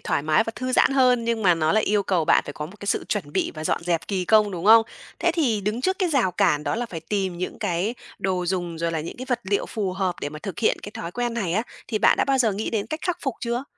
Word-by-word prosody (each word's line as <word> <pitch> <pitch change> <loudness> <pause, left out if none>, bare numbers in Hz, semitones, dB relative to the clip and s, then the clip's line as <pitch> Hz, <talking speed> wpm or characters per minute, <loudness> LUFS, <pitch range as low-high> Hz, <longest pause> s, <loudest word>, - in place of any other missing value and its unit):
thoải - - -1
mái 155 +7 +3
và 225 - -3
thư 255 0 -3
giãn - - +4
hơn, 250 -3 +3
nhưng 230 -1 -1
mà 180 -3 +5
nó 155 -1 +1
lại 215 - +3
yêu 205 0 +2
cầu 180 -4 +1
bạn - - +4
phải 145 - -5
có 150 +2 -5
một 200 +5 -15
cái 200 - -7
sự - - 0
chuẩn 180 -9 -3
bị - - 0
và 155 0 -6
dọn - - 0
dẹp 170 -2 -1
kỳ 190 -3 -1
công, 210 +1 +4
đúng 180 -1 -5
không? 225 +1 +8 0.4
Thế 345 0 +2
thì 245 - +1
đứng 215 +4 -2
trước 375 +6 0
cái 365 -2 +1
rào 255 - +2
cản 165 -6 +2
đó - - 0
là 240 +1 -2
phải 165 -6 -7
tìm 190 0 -2
những 180 - -4
cái 180 +7 -1 0.2
đồ 185 -2 -1
dùng 175 -3 -2
rồi 165 0 -1
là 160 - -1
những 160 - -7
cái 255 +1 -7
vật 245 -1 0
liệu 200 +1 0
phù 200 -4 -3
hợp 185 -2 -1
để 145 - -2
mà 155 - -8
thực 195 -5 -6
hiện 225 - +2
cái 205 - -7
thói 170 -5 -6
quen 240 -1 -2
này 190 -8 -1
á, 220 +4 +1 0.3
thì 215 -3 -1
bạn - - +5
đã - - +3
bao 270 -1 +1
giờ 225 -5 +3
nghĩ 210 +3 -3
đến 210 -3 -1
cách 310 +1 -5
khắc 360 -2 -1
phục 270 -5 -1
chưa? 240 +2 -2
205 Hz, 305 wpm, -24 LUFS, 175-235 Hz, 0.4 s, không